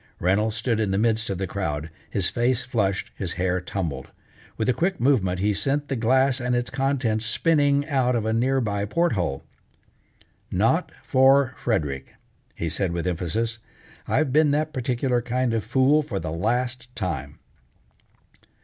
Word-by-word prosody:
Reynolds 105 +5 +1
stood 115 0 0
in 105 -2 0
the 95 - 0
midst 110 +1 +1
of 95 - -2
the 95 - -2
crowd, 80 -5 -3 0.2
his 95 0 +1
face 120 0 0
flushed, 105 -6 -1
his 90 -4 -3
hair 90 +1 0
tumbled. 90 -4 -4 0.5
With 110 - -1
a 125 - +4
quick 180 +6 -1
movement 110 -9 +2
he 105 +3 +1
sent 140 +8 -1
the 135 - 0
glass 130 +3 +3
and 125 0 0
its 120 0 -1
contents 135 -5 0
spinning 145 +4 +2
out 130 -4 +1
of 115 -2 -1
a 110 - 0
near 130 +4 +2
by 100 -3 -1
port 170 +10 +1
hole. 85 -9 -2 1.1
"Not - - +1
for 130 0 +4
Frederick!" 70 - -2 0.4
he 85 - -3
said 85 +2 -1
with 85 0 -3
emphasis, 95 +6 -2 0.5
"I've 155 -5 +1
been 155 0 +5
that 155 +2 0
particular 125 0 0
kind 125 0 -1
of 110 -2 0
a - - -19
fool 135 +5 +4
for 120 -10 -4
the 80 - -4
last 120 +8 -1
time." 70 -6 -4
115 Hz, 165 wpm, -24 LUFS, 95-130 Hz, 1.1 s, been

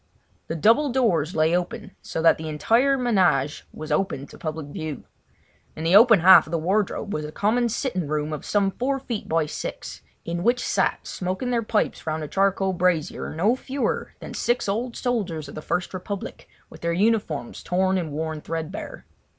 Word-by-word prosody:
The 165 - -3
double 230 - +4
doors 190 - +1
lay 160 +2 +3
open, 205 +3 -3
so 160 - -4
that 165 - +5
the 160 0 -5
entire 230 - +2
ménage 180 - +2
was 155 0 -8
open 150 -4 0
to - - -14
public 155 -1 -4
view. 155 -3 -5 0.7
In 160 - -6
the 170 +3 +3
open 220 -3 +7
half 185 -1 +8
of - - -10
the 170 - +1
wardrobe 200 +4 -1
was 155 - -2
a 150 - -6
common 235 +7 +1
sitting 220 - -2
room 150 +1 -2
of 150 - -5
some 200 -2 +1
four 270 +6 -1
feet 235 -5 -5
by 160 -1 +2
six, 150 - -6 0.2
in 170 +1 -3
which 240 +5 +2
sat, - - 0
smoking 185 +7 -3
their 235 -1 +1
pipes 215 -6 -1
round 155 0 -2
a - - -4
charcoal 195 +1 +1
brazier, 175 -3 0
no 205 +9 +3
fewer 265 +1 -3
than - - -8
six 240 -1 0
old 230 +5 -2
soldiers 195 - -2
of - - -10
the 155 - -6
First 180 +4 -2
Republic, 190 +2 -6 0.2
with - - -14
their 170 0 0
uniforms 195 - 0
torn 185 +1 +1
and 165 -4 -4
worn 155 +1 -3
threadbare. 165 - -6
185 Hz, 185 wpm, -24 LUFS, 160-225 Hz, 0.7 s, half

